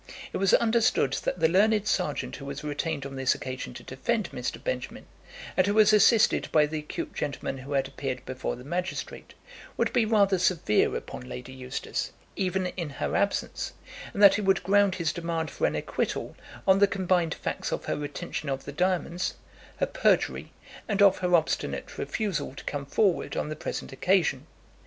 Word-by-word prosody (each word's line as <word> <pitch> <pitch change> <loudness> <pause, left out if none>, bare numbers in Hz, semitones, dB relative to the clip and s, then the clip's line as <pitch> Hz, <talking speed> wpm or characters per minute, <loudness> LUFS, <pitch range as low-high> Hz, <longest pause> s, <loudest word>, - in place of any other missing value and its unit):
It - - -1
was 195 -1 +4
understood 225 - +2
that - - -1
the 160 - +6
learned 210 +4 +3
serjeant 180 -8 -1
who 140 - -9
was 140 +1 -6
retained 150 0 -2
on 135 0 -6
this 130 -1 +2
occasion 130 -1 -6
to - - -9
defend 215 - -2
Mr. - - -3
Benjamin, - - -4 0.5
and 185 0 +3
who 205 - +1
was 215 0 +6
assisted 215 +1 +4
by 150 -1 +5
the 155 +1 -3
acute 150 - -5
gentleman 140 -2 -3
who 135 +3 -6
had 135 -1 +1
appeared 130 -2 -5
before 130 0 -3
the 125 - -11
magistrate, 180 +6 -4 0.4
would - - +1
be 235 - +4
rather 200 -4 +3
severe 170 - +2
upon 65 0 -7
Lady 60 - -7
Eustace, 130 -1 -4 0.2
even 190 0 0
in 180 -3 -4
her 140 - -3
absence; 200 0 -1 0.4
and 205 - 0
that 200 - +10
he 210 - 0
would 195 -2 +2
ground 200 0 +4
his 165 -4 -1
demand 165 -2 -3
for - - +1
an - - -2
acquittal - - -2 0.3
on 190 0 +6
the 200 - +6
combined 180 -4 +1
facts - - -3
of - - -3
her - - -1
retention 145 0 -5
of 135 0 -3
the - - -5
diamonds, 180 +2 0 0.4
her - - +2
perjury, - - +1 0.4
and 205 -1 +3
of 195 -2 +6
her 180 -1 +3
obstinate 160 -2 -1
refusal 200 - -2
to - - -9
come 140 -1 -4
forward 195 +3 +1
on - - -1
the 155 - -3
present 145 - -5
occasion. 185 +6 +1
175 Hz, 185 wpm, -27 LUFS, 140-195 Hz, 0.5 s, that